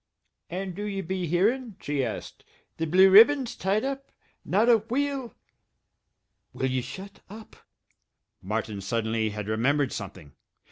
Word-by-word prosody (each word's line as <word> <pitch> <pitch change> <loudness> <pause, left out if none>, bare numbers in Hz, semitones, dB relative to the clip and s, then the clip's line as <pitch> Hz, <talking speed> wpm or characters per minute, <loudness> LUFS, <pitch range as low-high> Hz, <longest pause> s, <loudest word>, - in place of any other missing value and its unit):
"And 185 +1 -4
do 200 - -7
ye 200 -2 -3
be 185 0 -3
hearin?" 215 - +1
she 145 -2 -2
asked. 115 - -6 0.3
"The 165 - -2
Blue 185 +4 +6
Ribbon's 240 +4 +6
tied 200 +4 0
up! 275 0 -5 0.3
Not 210 +6 +2
a 235 -2 +7
wheel 260 +2 -3 0.6
" - - -52
"Will 130 0 -1
ye 130 0 0
shut 190 +11 -9
up?" 215 +2 -12 0.9
Martin 105 0 -3
suddenly 110 +2 -1
had 105 -1 -6
remembered 130 +5 +1
something. 95 -8 -8
185 Hz, 140 wpm, -26 LUFS, -, 0.9 s, a